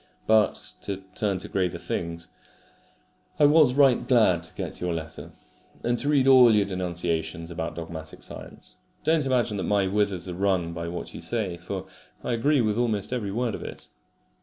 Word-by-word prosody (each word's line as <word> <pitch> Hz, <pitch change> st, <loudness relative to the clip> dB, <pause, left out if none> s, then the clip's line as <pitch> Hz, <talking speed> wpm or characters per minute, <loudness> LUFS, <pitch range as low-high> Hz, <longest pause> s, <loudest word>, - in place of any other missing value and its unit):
But, 110 Hz, -1 st, +2 dB
to 100 Hz, -, -4 dB, 0.2 s
turn 100 Hz, -1 st, 0 dB
to -, -, -5 dB
graver 90 Hz, -3 st, -1 dB
things: 85 Hz, 0 st, -4 dB, 1.1 s
I 150 Hz, -, +5 dB
was 145 Hz, -4 st, +5 dB
right 135 Hz, -4 st, +4 dB
glad 110 Hz, -9 st, +4 dB
to 80 Hz, -, -11 dB
get -, -, -5 dB
your 90 Hz, -1 st, -1 dB
letter, 80 Hz, 0 st, -7 dB, 0.5 s
and 120 Hz, -, +1 dB
to 145 Hz, -, -1 dB
read 140 Hz, -3 st, +3 dB
all 125 Hz, -4 st, +8 dB
your 105 Hz, -1 st, +3 dB
denunciations 85 Hz, -3 st, -2 dB
about 80 Hz, 0 st, -4 dB
dogmatic 80 Hz, -1 st, -8 dB
science. -, -, -10 dB, 0.3 s
Don't 160 Hz, -3 st, +2 dB
imagine 120 Hz, -5 st, +1 dB
that -, -, -2 dB
my 100 Hz, -2 st, +2 dB
withers 95 Hz, -2 st, 0 dB
are 90 Hz, -, -4 dB
wrung 90 Hz, -3 st, 0 dB
by 85 Hz, 0 st, -5 dB
what 85 Hz, +1 st, -6 dB
you -, -, -8 dB
say, 105 Hz, -7 st, -2 dB
for 90 Hz, +2 st, -6 dB, 0.4 s
I -, -, -2 dB
agree 130 Hz, +4 st, +2 dB
with 110 Hz, 0 st, 0 dB
almost 110 Hz, -2 st, 0 dB
every 105 Hz, -6 st, -2 dB
word 120 Hz, +1 st, -1 dB
of -, -, -5 dB
it. -, -, -9 dB
100 Hz, 180 wpm, -26 LUFS, 85-120 Hz, 1.1 s, all